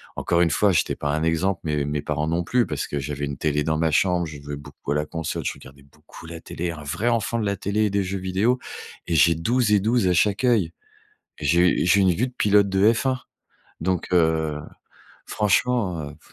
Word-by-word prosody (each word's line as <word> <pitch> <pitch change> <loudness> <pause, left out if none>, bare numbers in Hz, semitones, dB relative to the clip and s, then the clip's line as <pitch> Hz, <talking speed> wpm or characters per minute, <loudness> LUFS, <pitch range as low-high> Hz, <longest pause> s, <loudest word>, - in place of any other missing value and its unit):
encore 85 0 0
une 85 -3 +3
fois, 100 +7 +3
j'étais 90 - +1
pas 75 - -3
un 80 +1 -1
exemple, 85 +4 0
mais 75 -2 0
mes 75 0 -2
parents 75 +1 -2
non 85 +1 -1
plus 125 +2 +2
parce 75 -2 -4
que 75 - -4
j'avais 70 +1 -3
une 70 0 -5
télé 75 -1 0
dans 80 0 0
ma 80 0 +1
chambre, 90 +2 +2
je 75 -3 -9
jouais 70 0 -6
beaucoup 70 0 -6
à - - -2
la 75 - 0
console, 80 0 -4
je - - 0
regardais 70 +1 -15
beaucoup 70 +3 -15
la 85 0 -8
télé, 85 +1 -4
un 75 -2 -9
vrai 100 +12 -1
enfant 115 0 0
de 110 - -1
la 100 -1 -1
télé 105 +3 0
et - - -2
des 100 0 0
jeux 95 +1 -4
vidéo. 95 +7 +1 0.5
Et 85 - 0
j'ai 80 +3 +5
12 110 +6 +1
et 100 - +4
12 115 -2 +2
à 90 - +3
chaque 100 +7 +2
oeil. 105 -9 +2 0.7
J'ai 85 +4 +3
u - - -1
j'ai 95 +3 +4
une 95 - +4
vue 110 +9 0
de 125 - -12
pilote 100 -1 +3
de 95 +3 +4
F1 130 +2 -1 0.6
donc, 90 0 -1
heu, 80 -3 +2 0.7
franchement, 100 -7 0
heu 75 - -16
85 Hz, 230 wpm, -23 LUFS, 75-100 Hz, 0.7 s, j'ai